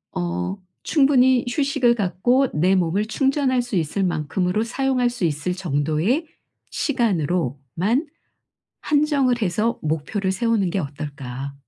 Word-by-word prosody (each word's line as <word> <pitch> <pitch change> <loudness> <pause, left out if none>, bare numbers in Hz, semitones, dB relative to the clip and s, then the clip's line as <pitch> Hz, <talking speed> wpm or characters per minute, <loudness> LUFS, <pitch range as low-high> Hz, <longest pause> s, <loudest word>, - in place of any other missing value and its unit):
어 90 - -2 0.3
충분히 260 -4 +4
휴식을 250 -3 +2
갖고 245 +7 +2
내 180 +5 +3
몸을 185 +3 +1
충전할 265 +2 +1
수 245 -3 -5
있을 170 +3 0
만큼으로 180 +4 0
사용할 250 +1 0
수 240 -7 -2
있을 155 +3 -1
정도의 170 - 0 0.5
시간으로만 180 - -1 0.7
한정을 285 -5 +2
해서 215 +4 0
목표를 165 +6 -1
세우는 215 -1 +1
게 195 +3 -1
어떨까? 140 -3 -6
195 Hz, 260 characters per minute, -22 LUFS, 155-250 Hz, 0.7 s, 충분히